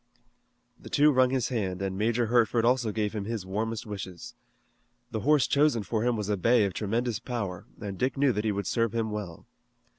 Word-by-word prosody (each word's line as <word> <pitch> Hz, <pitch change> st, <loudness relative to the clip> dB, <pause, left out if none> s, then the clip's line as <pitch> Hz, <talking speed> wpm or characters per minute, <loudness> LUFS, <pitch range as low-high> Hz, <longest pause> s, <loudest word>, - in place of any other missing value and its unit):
The -, -, -11 dB
two 150 Hz, +1 st, +5 dB
wrung 130 Hz, -2 st, +4 dB
his 130 Hz, -3 st, 0 dB
hand 95 Hz, -7 st, -2 dB
and 95 Hz, -1 st, -2 dB
Major 115 Hz, +4 st, +1 dB
Hertford 115 Hz, 0 st, +2 dB
also 120 Hz, -2 st, +2 dB
gave 105 Hz, 0 st, -1 dB
him 105 Hz, -2 st, -3 dB
his 110 Hz, -3 st, -4 dB
warmest 110 Hz, +3 st, -3 dB
wishes. 95 Hz, -4 st, -7 dB, 0.8 s
The 110 Hz, -, -2 dB
horse 150 Hz, +4 st, +3 dB
chosen 140 Hz, -6 st, +2 dB
for 110 Hz, +1 st, -1 dB
him 120 Hz, 0 st, +2 dB
was 105 Hz, -2 st, -3 dB
a 105 Hz, -1 st, 0 dB
bay 115 Hz, +3 st, +4 dB
of 95 Hz, -, -2 dB
tremendous 115 Hz, +3 st, -1 dB
power, 100 Hz, -8 st, -5 dB
and 100 Hz, -2 st, -6 dB
Dick 130 Hz, +2 st, 0 dB
knew 140 Hz, -1 st, +4 dB
that 105 Hz, -2 st, -2 dB
he 110 Hz, -, +1 dB
would 100 Hz, 0 st, -3 dB
serve 115 Hz, -2 st, 0 dB
him 110 Hz, -1 st, -1 dB
well. 100 Hz, -6 st, -6 dB
110 Hz, 205 wpm, -28 LUFS, 100-120 Hz, 0.8 s, two